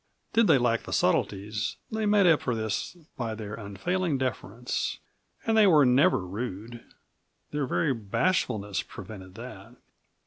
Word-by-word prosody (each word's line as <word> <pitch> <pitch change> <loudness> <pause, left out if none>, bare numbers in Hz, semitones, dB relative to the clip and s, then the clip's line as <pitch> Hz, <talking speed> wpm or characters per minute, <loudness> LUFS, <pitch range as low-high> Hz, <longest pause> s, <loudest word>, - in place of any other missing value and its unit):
Did 230 -1 +4
they - - +6
lack 120 -2 +1
the - - -7
subtleties, 105 +2 0 0.2
they 220 -1 -1
made 205 -1 +5
up 165 -4 +5
for 125 - -1
this 110 - -3 0.2
by 115 -3 -3
their 105 -1 -7
unfailing 145 - -2
deference. 125 -2 -3 0.5
And 225 -2 +2
they 215 -2 +6
were 155 -6 +6
never 125 - +4
rude; 115 +3 -6 0.7
their 145 -2 -1
very 145 +2 +1
bashfulness 110 - 0
prevented 95 -3 -10
that. 115 -1 -10
120 Hz, 140 wpm, -28 LUFS, 105-155 Hz, 0.7 s, they